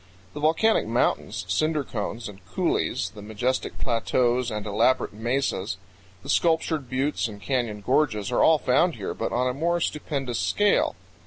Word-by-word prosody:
The 150 - -6
volcanic 160 - +3
mountains, 115 -5 0
cinder 150 - +1
cones, 115 -1 -4
and 100 -3 -12
coulees, - - 0
the 105 - -11
majestic 110 +5 -2
plateaus 120 +1 +1
and 105 -2 -4
elaborate 105 +5 +2
mesas, 110 -4 -1 0.5
the - - -10
sculptured 160 -4 +1
buttes 135 +1 0
and 105 -2 -9
canyon 115 -3 -2
gorges, 115 -3 +1
are 120 - +2
all 160 - +6
found 150 +6 +2
here, - - -4
but - - -3
on 125 +1 +1
a 125 - 0
more 170 +5 0
stupendous 140 -6 -2
scale. 205 0 +2
125 Hz, 155 wpm, -25 LUFS, 110-150 Hz, 0.5 s, all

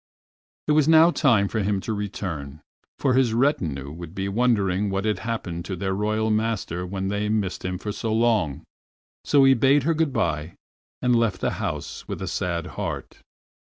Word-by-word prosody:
It - - +2
was 150 -1 +4
now 160 +1 +7
time 115 -12 +3
for 110 - -2
him 100 -1 0
to 110 - -3
return, 85 -8 -5 0.4
for 130 - +1
his 125 -3 +3
retinue 80 - 0
would 85 +2 -9
be 95 0 -2
wondering 100 -3 +1
what 95 +1 -2
had 105 -1 0
happened 100 -7 -4
to 95 - -4
their 95 +2 -2
Royal 110 +2 0
master 105 -5 -1
when 95 +1 -3
they 105 +1 -1
missed 105 -4 -1
him 90 0 -2
for 105 +2 -5
so 110 +2 -3
long. 110 - +1 0.6
So 140 -2 +4
he 135 0 +7
bade 135 +3 +4
her 165 +3 +2
good 160 -2 0
by, 75 - -1 0.5
and 125 -1 +3
left 115 -5 +1
the - - 0
house - - -4
with - - -5
a - - -4
sad 85 -2 -2 0.2
heart. - - -5
105 Hz, 185 wpm, -24 LUFS, 90-120 Hz, 0.6 s, now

